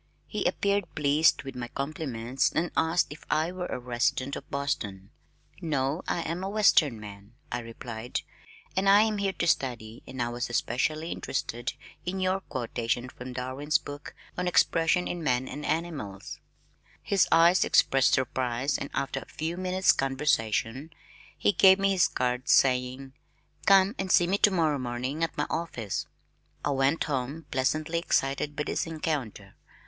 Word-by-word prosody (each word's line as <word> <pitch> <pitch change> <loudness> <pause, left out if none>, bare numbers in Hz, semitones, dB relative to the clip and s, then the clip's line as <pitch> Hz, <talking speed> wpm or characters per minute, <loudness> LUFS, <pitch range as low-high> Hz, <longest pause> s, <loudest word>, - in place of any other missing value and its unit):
He - - -4
appeared 200 -2 +1
pleased 150 +2 +3
with 135 -1 -8
my 120 -1 -4
compliments 135 -3 -2
and 170 +2 -1
asked 165 +2 +2
if 155 - -15
I 155 +3 +1
were 180 -1 -4
a - - -3
resident 125 +2 -1
of - - -9
Boston. 100 -9 -3 0.5
"No, 145 -1 -1
I 170 - 0
am 170 +3 -3
a 195 - -2
western 170 - +4
man," 100 0 -11 0.2
I 120 - -1
replied. 115 0 -5 0.5
"I 190 - +2 0.2
am 215 -2 0
here 195 -1 0
to 170 - -2
study 120 -8 -1
and 130 - -8
I 120 0 0
was 120 0 -3
especially 155 +7 -1
interested 120 -2 -3 0.3
in 185 +2 -3
your 185 +1 +1
quotations 120 -4 -3
from 125 +1 -8
Darwin's 130 +4 0
book 145 +1 -9 0.2
on 180 - -1
Expression 175 0 +3
in 175 - -4
Man 130 -3 +1
and 150 - -6
Animals." 150 - -4 0.6
His 195 -3 +3
eyes 170 +3 +6
expressed 135 -1 +4
surprise 130 +1 -1
and 140 - -5
after 135 0 -1
a - - -11
few 160 +2 -4
minutes' 185 +1 +2
conversation, 135 -1 0 0.5
he - - +3
gave 190 -1 +6
me 195 0 +2
his 185 -3 +4
card 125 0 -2
saying, 130 0 +2 0.5
"Come 195 +1 +6
and 190 -1 -1
see 175 - +6
me 195 +3 0
tomorrow 165 -8 +3
morning 130 +5 -3
at 165 - -2
my - - +1
office." 120 - -3 0.6
I 145 - +1
went 135 +3 +2
home 140 +2 -3
pleasantly 155 +5 0
excited 145 -2 0
by 150 - -1
this - - -2
encounter. 140 - -4
140 Hz, 155 wpm, -28 LUFS, 125-170 Hz, 0.6 s, eyes